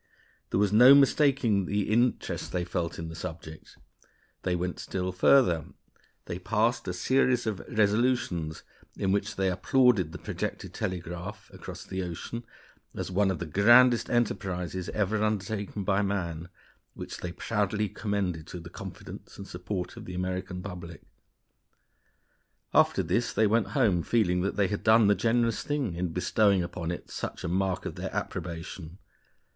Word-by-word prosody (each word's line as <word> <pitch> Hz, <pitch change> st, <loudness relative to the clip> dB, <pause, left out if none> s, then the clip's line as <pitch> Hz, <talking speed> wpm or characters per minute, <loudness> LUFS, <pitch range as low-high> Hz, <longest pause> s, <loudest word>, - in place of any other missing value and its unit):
There -, -, 0 dB
was 105 Hz, 0 st, +2 dB
no 125 Hz, +5 st, +9 dB
mistaking 135 Hz, -8 st, +3 dB
the 100 Hz, +2 st, -1 dB
interest 120 Hz, +2 st, 0 dB
they 90 Hz, -1 st, -1 dB
felt 85 Hz, -1 st, -3 dB
in 80 Hz, -, -5 dB
the -, -, -7 dB
subject. 80 Hz, -2 st, -8 dB, 0.6 s
They 90 Hz, -1 st, 0 dB
went 90 Hz, 0 st, -3 dB
still 95 Hz, -1 st, -3 dB
further; 90 Hz, -, +4 dB, 0.6 s
they 85 Hz, -, -5 dB
passed 115 Hz, +5 st, 0 dB
a -, -, 0 dB
series 125 Hz, +5 st, +2 dB
of 105 Hz, -4 st, -2 dB
resolutions, 105 Hz, -7 st, +1 dB, 0.3 s
in 95 Hz, -, 0 dB
which 100 Hz, +1 st, 0 dB
they 95 Hz, 0 st, +1 dB
applauded 100 Hz, -2 st, +3 dB
the -, -, -7 dB
projected -, -, -5 dB
telegraph 90 Hz, +1 st, -5 dB
across -, -, -8 dB
the 95 Hz, -, -4 dB
ocean 90 Hz, +7 st, -6 dB, 0.5 s
as -, -, -4 dB
one 100 Hz, +1 st, +2 dB
of 95 Hz, -, -1 dB
the 85 Hz, -, -4 dB
grandest 120 Hz, +8 st, +5 dB
enterprises 95 Hz, -6 st, -1 dB
ever 105 Hz, +1 st, 0 dB
undertaken 105 Hz, -1 st, -2 dB
by 95 Hz, +1 st, +2 dB
man, 85 Hz, -4 st, -2 dB, 0.5 s
which -, -, -7 dB
they 90 Hz, -, -4 dB
proudly 105 Hz, +2 st, -1 dB
commended 95 Hz, -6 st, -3 dB
to 90 Hz, -, -7 dB
the 85 Hz, 0 st, -11 dB
confidence -, -, -9 dB
and 100 Hz, -, -8 dB
support 90 Hz, +1 st, -5 dB
of -, -, -9 dB
the 90 Hz, -, -7 dB
American 90 Hz, 0 st, -3 dB
public. 90 Hz, -4 st, -8 dB, 1.7 s
After -, -, +4 dB
this 95 Hz, +9 st, 0 dB
they 110 Hz, -, +3 dB
went 110 Hz, +2 st, +2 dB
home 100 Hz, -10 st, +3 dB
feeling 90 Hz, -4 st, +1 dB
that 100 Hz, -, -1 dB
they 100 Hz, -2 st, +2 dB
had 105 Hz, -, -3 dB
done 110 Hz, 0 st, +6 dB
the 100 Hz, -, +5 dB
generous 115 Hz, +1 st, +1 dB
thing 145 Hz, -, -2 dB
in 90 Hz, +2 st, -2 dB
bestowing 90 Hz, +3 st, +2 dB
upon 85 Hz, -1 st, -5 dB
it 85 Hz, -, -6 dB
such -, -, -5 dB
a -, -, -2 dB
mark 95 Hz, +1 st, -1 dB
of -, -, -3 dB
their -, -, -5 dB
approbation. 85 Hz, 0 st, -5 dB
95 Hz, 155 wpm, -28 LUFS, 90-110 Hz, 1.7 s, no